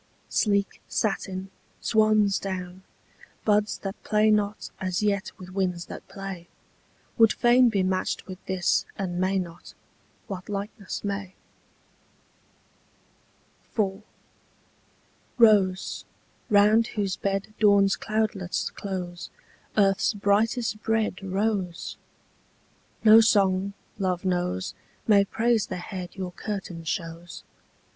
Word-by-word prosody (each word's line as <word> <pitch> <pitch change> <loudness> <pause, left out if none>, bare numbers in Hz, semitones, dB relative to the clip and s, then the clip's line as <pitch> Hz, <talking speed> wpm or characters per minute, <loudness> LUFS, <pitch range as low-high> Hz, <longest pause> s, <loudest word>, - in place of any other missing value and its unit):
Sleek 200 -2 +1
satin, 195 -2 -2 0.3
swansdown, 200 -4 +1 0.6
buds 210 0 +2
that 195 0 -6
play 215 0 +3
not 210 0 0
As 185 +1 -1
yet 200 -2 0
with 185 0 -10
winds 180 -3 -1
that - - -9
play, 195 -3 -7 0.7
Would 225 -1 +7
fain 245 0 +5
be 200 -4 +1
matched 185 0 -1
with 185 0 -9
this, 190 -2 +1
and 180 -3 -2
may 190 +1 +2
not: 170 -2 -6 0.5
What 190 -1 -7
likeness 200 -1 -5
may? 200 -2 -4 2.4
IV. 195 -1 0 1.4
Rose, 205 -5 +4 0.5
round 215 +2 +5
whose 200 -5 -2
bed 195 +1 -2
Dawn's 200 -2 +5
cloudlets 215 -4 -1
close, 180 -3 -5 0.5
Earth's 195 +1 +3
brightest 215 +2 +1
bred 220 -4 0
Rose! 195 -2 -2 1.1
No 220 0 +9
song, 200 -3 +3 0.3
love 185 -1 -1
knows, 175 - -1 0.3
May 200 -2 +5
praise 225 +1 +1
the 185 - -4
head 180 0 -7
Your 185 -2 -4
curtain 190 -4 -5
shows. 170 0 -5
195 Hz, 105 wpm, -26 LUFS, 185-210 Hz, 2.4 s, No